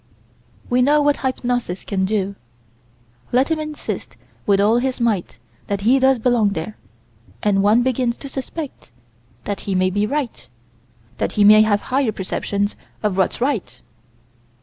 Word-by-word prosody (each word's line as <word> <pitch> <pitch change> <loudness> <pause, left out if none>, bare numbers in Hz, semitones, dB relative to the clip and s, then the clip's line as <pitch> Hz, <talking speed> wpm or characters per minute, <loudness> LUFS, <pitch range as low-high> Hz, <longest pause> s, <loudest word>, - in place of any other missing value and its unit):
We 245 +1 +2
know 290 +4 +4
what 290 0 +3
hypnosis 245 -7 -2
can 190 -2 -1
do: 200 -1 -1 1.0
let 260 +6 +2
him 320 - +1
insist 305 -1 -5 0.3
with 200 -1 +4
all 215 +4 +4
his 260 0 -2
might 220 - -1 0.3
that 200 -1 -2
he 245 +6 +4
does 265 0 +4
belong 225 -3 +2
there, 170 +6 -5 0.7
and 200 -2 +3
one 215 +4 +4
begins 250 -1 0
to 280 - -8
suspect 275 - -7 0.5
that 200 -1 -3
he 195 - 0
may 185 0 +2
be 205 +2 0
right; 280 -3 -3 0.7
that - - -1
he 210 - +3
may 215 +1 +8
have 205 -1 +2
higher 265 -4 +2
perceptions 200 +1 -2 0.3
of 210 -3 +1
what's 190 -1 0
right. 235 - -2
220 Hz, 150 wpm, -20 LUFS, 200-260 Hz, 1.0 s, may